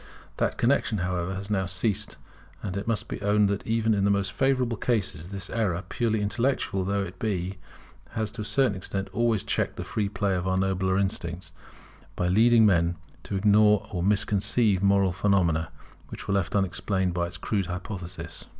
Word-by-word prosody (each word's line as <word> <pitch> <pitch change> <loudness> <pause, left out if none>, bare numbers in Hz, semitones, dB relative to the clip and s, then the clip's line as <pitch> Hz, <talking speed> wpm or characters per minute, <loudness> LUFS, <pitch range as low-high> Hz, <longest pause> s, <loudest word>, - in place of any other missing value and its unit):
That - - 0
connexion, 120 -2 +2
however, 90 0 -2
has 100 +2 -5
now 95 -2 +1
ceased; 95 +3 0 0.5
and 95 -3 -4
it 100 +2 -4
must 115 -2 0
be - - -6
owned 105 0 +3
that 100 0 -3
even 110 0 +2
in 100 -2 +1
the 100 - +3
most 100 -1 +1
favourable 130 -2 +1
cases 95 -8 -1
this 95 -2 -4
error, 95 -6 0
purely 110 -3 0
intellectual 105 -2 0
though 100 +1 0
it 90 -1 -8
be, 95 -3 -2 0.5
has 110 -1 -2
to 115 0 -7
a - - -2
certain 115 +2 +2
extent 95 0 -4
always 115 -4 +1
checked - - -1
the - - -5
free 105 -2 -2
play 100 -1 0
of 90 0 -1
our 95 0 +1
nobler 95 0 +1
instincts, 95 -3 -2 0.6
by 90 - 0
leading 115 +3 +5
men 85 -3 +3 0.3
to - - -3
ignore 105 +1 +4
or 90 -4 -2
misconceive 100 +1 +2
moral 100 -2 +3
phenomena, 85 -5 +1 0.4
which - - -8
were 100 - 0
left 100 -2 0
unexplained 95 0 0
by 85 0 0
its 85 0 -8
crude 100 -5 -1
hypothesis. 90 -2 -6
100 Hz, 180 wpm, -26 LUFS, 90-105 Hz, 0.6 s, leading